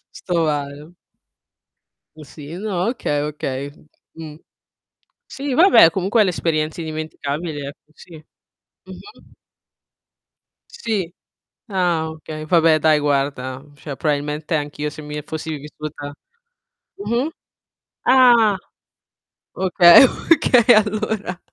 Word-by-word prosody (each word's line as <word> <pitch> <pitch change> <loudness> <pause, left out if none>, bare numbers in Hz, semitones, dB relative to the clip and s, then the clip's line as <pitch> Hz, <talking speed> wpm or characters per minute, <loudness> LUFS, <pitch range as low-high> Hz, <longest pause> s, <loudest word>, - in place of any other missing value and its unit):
Sto 170 -3 -1
male. 145 +2 -4 1.2
Mhmm, 155 - -12
sì 145 +3 -11
no, 200 -1 -2
okay, 145 - -2
okay, 140 -2 -4
uhm, 150 +1 -17 0.3
mhmm, 155 -2 -10 0.9
sì 275 -1 -5
vabbè 330 - +6
comunque 195 +5 +1
è - - +4
l'esperienza 160 -3 -2
indimenticabile 155 -1 -5
ecco, 150 +1 -17
sì, 170 +2 -15 0.5
mh-mh. 190 - -16 1.3
Sì, 205 - -4 0.5
ah 175 -5 0
okay, 155 -1 -8
vabbè 165 -2 +3
dai 155 0 +3
guarda, 135 -2 -2
cioè 145 -1 -8
probabilmente 150 +2 -2
anch'io 150 0 -3
se 155 +1 -11
mi 150 0 -6
fossi 160 0 -6
vissuta 145 0 -9 0.8
mh-mh, 280 -7 -2 0.8
ah, 240 -6 +5 1.0
okay, 180 +1 +6
okay 255 -4 +4
allora. 215 -3 -1
160 Hz, 100 wpm, -20 LUFS, 150-195 Hz, 1.3 s, vabbè